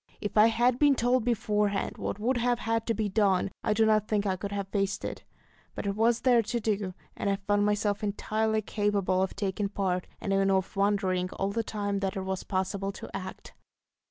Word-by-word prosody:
If 205 - -4
I 215 +1 +7
had 240 +2 +2
been 290 -2 +5
told 245 0 +2
beforehand 210 -3 0
what - - -3
would 240 +4 0
have 240 0 +1
had 225 -1 -1
to 230 - +1
be 215 0 0
done, 195 -2 +2
I - - +2
do 220 +1 +4
not 215 -1 +3
think 210 -1 0
I 190 -2 +1
could 200 +2 -5
have 200 -1 -3
faced 195 -1 -1
it; - - -5 0.5
but - - -5
it 200 0 -1
was 230 +2 +2
there 245 -3 +5
to 230 +2 -2
do, 205 -4 -1 0.2
and 200 - -1
I 200 - +2
found 205 +1 +1
myself 205 0 0
entirely 215 +1 0
capable 200 -3 0
of 190 - -1
taking 200 0 -2
part, 185 -3 -1
and 195 - -2
even 195 0 +3
of 190 +1 0
wondering 195 -2 +1
all 195 +1 -1
the 230 +3 0
time 205 -2 -2
that 195 -1 -2
it 190 - -2
was 190 -1 -3
possible 195 +1 -2
to - - -9
act. 190 -1 -7
205 Hz, 215 wpm, -28 LUFS, 195-220 Hz, 0.5 s, I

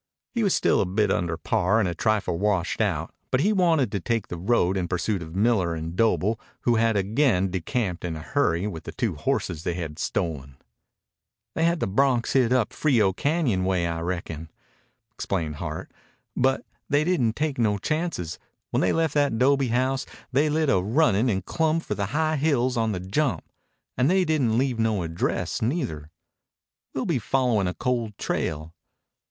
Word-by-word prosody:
He 235 - 0
was 200 -4 +3
still - - +3
a 100 - 0
bit 105 +2 +1
under 85 -2 0
par, 105 +5 +1
a 95 -5 +1
trifle 105 -2 0
washed 100 -3 0
out, - - -1 0.2
but 130 - +2
he 210 +6 +3
wanted 165 - +2
to 100 - -1
take 115 +3 -2
the - - -4
road 95 -1 +2
in 90 -2 -1
pursuit 95 +2 -1
of 80 0 -8
Miller 100 -5 +2
and 80 +1 -5
Doble, 110 0 +2 0.2
who 120 -2 +2
had 115 -1 +2
again 100 -2 +2
decamped 95 +1 -2
in 85 -2 -3
a - - -5
hurry 90 - 0
with 85 -6 -5
the - - -7
two - - -1
horses 80 - -2
they 85 0 -2
had 80 -4 -5
stolen. 70 -5 -3 1.0
"They 165 - +1
had 170 0 +2
the - - +1
broncs 125 +3 +2
hid 125 -3 +3
up 125 -4 +2
Frio 115 -10 +2
Cañon 140 - 0
way, 90 -2 +1
I 85 -1 -2
reckon," 85 -2 -4 0.6
explained 80 -9 -3
Hart. 80 -1 -5 0.4
"But 130 +1 +1 0.2
they 145 +1 +3
didn't 135 -10 +1
take 150 -4 -2
no 105 -3 +2
chances. 155 - -2 0.3
When - - +1
they - - +2
left 165 -1 +1
that 145 -6 +2
'dobe 135 +1 +3
house 130 +3 0 0.2
they 145 +4 +3
lit 155 +1 +1
a 95 - +3
runnin' 115 - +2
and 95 -4 -1
clumb 160 0 +1
for - - -4
the 100 -1 -2
high 155 +5 0
hills 135 -4 +1
on 115 -2 +1
the 95 - -3
jump. 100 - -1 0.5
And 130 +3 +2
they 185 0 +3
didn't 135 -9 +1
leave 130 -2 0
no 110 -5 +1
address 80 0 -2
neither. 110 - -2 0.9
We'll 130 - -1
be 160 -8 +1
followin' 120 -4 +1
a 90 - -3
cold 120 -5 -2
trail. 80 +1 -3
110 Hz, 180 wpm, -25 LUFS, 90-135 Hz, 1.0 s, was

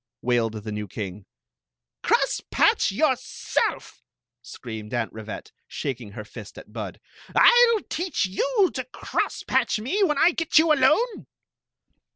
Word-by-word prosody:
wailed 120 -2 +1
the 110 - -5
new 105 0 -4
king. 100 0 -7 0.7
"Crosspatch - - +2
yourself!" - - -1 0.4
screamed 110 -1 -7
Aunt 115 -2 -2
Rivette, 110 -1 -8 0.2
shaking 120 -7 -5
her 105 -2 -7
fist - - -11
at - - -13
Bud - - -6 0.2
" - - -19
I 485 0 +7
'11 425 - -5
teach 350 - -1
you 400 - +1
to 260 - -3
cross 255 - -3
patch - - +1
mc 265 - -1
when 305 -7 +2
I 340 - +5
get 330 -2 0
you 315 0 +6
alone 305 - +2
190 Hz, 140 wpm, -24 LUFS, -, 0.7 s, I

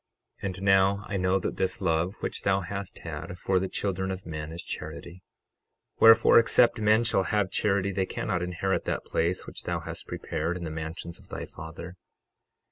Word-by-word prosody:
12:34 - - -19
And 95 0 -5
now 95 0 +4
I 100 - -1
know 95 +1 +2
that 95 - -3
this 95 +5 0
love 90 0 0
which - - -3
thou 95 0 +2
hast 100 +2 -6
had 90 - -6
for 95 +1 +1
the 95 - -1
children 95 -1 -2
of 95 0 -5
men 75 -1 -5
is 85 +2 -6
charity; 90 +2 -7 0.8
wherefore, 115 +1 +8
except 115 0 +4
men 110 +2 +4
shall 105 -5 +2
have 105 -3 0
charity 100 -1 +1
they 95 -1 -1
cannot 90 -5 -2
inherit 90 +2 -1
that - - -2
place 85 +3 0
which - - -7
thou - - -2
hast - - -6
prepared 85 +3 -3
in 90 - -6
the 80 - -4
mansions 80 +3 -6
of 100 - -19
thy - - -5
Father. 85 +3 -9
95 Hz, 190 wpm, -28 LUFS, 85-100 Hz, 0.8 s, wherefore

